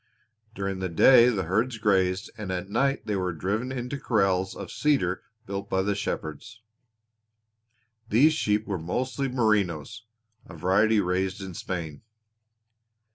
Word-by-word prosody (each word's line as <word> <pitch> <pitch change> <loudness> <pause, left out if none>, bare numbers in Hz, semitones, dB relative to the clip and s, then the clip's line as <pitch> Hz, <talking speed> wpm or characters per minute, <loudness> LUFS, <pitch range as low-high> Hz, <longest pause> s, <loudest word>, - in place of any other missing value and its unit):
During 95 -1 -3
the 95 -1 -2
day 120 +8 +7
the 105 -6 -1
herds 110 +8 0
grazed, 95 -3 +1
and 105 -4 -5
at 90 +1 -4
night 135 +4 +1
they 105 - -1
were 90 -2 -1
driven 105 - -2
into 130 +2 -4
corrals 95 -6 +1
of - - -8
cedar 135 -12 +1 0.2
built 100 +1 -5
by 95 0 +1
the 100 +1 0
shepherds. 105 +3 -5 1.5
These 145 +9 +5
sheep 105 -8 0
were 100 -4 -3
mostly 130 - -2
Merinos, 110 - 0 0.4
a 90 - -11
variety 100 +6 +3
raised 95 +1 -1
in 95 -2 -7
Spain. 85 -4 -5
100 Hz, 135 wpm, -26 LUFS, 95-115 Hz, 1.5 s, day